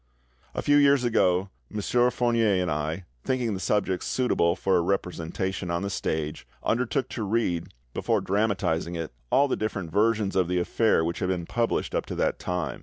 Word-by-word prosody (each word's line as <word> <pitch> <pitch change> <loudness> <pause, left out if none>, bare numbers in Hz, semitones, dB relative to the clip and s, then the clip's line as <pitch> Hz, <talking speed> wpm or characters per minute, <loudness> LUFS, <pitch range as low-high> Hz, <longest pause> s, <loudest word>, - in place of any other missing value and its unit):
A - - -2
few 145 0 +5
years 140 -2 +5
ago, 95 -5 +2 0.2
M. 105 - -3 0.3
Fournier 115 -5 +2
and 90 -2 0
I, 80 +4 -2 0.2
thinking 125 -4 0
the 95 - -3
subject 95 -2 0
suitable 85 -9 +1
for 95 -2 +2
representation 90 0 -2
on 85 +2 -1
the 100 - -2
stage, 80 -3 -3 0.2
undertook 125 +2 0
to 115 - -5
read, 100 -5 -1 0.2
before - - +1
dramatising 95 -5 0
it, 80 -5 -5 0.2
all 140 - +4
the - - 0
different 100 -6 -3
versions 105 0 +2
of 95 -2 +3
the 90 +1 0
affair 90 0 +2
which 85 +1 -2
had 90 - -1
been 90 -2 -1
published 115 +5 -1
up - - -1
to - - -4
that - - 0
time. 90 -1 -3
95 Hz, 180 wpm, -26 LUFS, 85-115 Hz, 0.3 s, few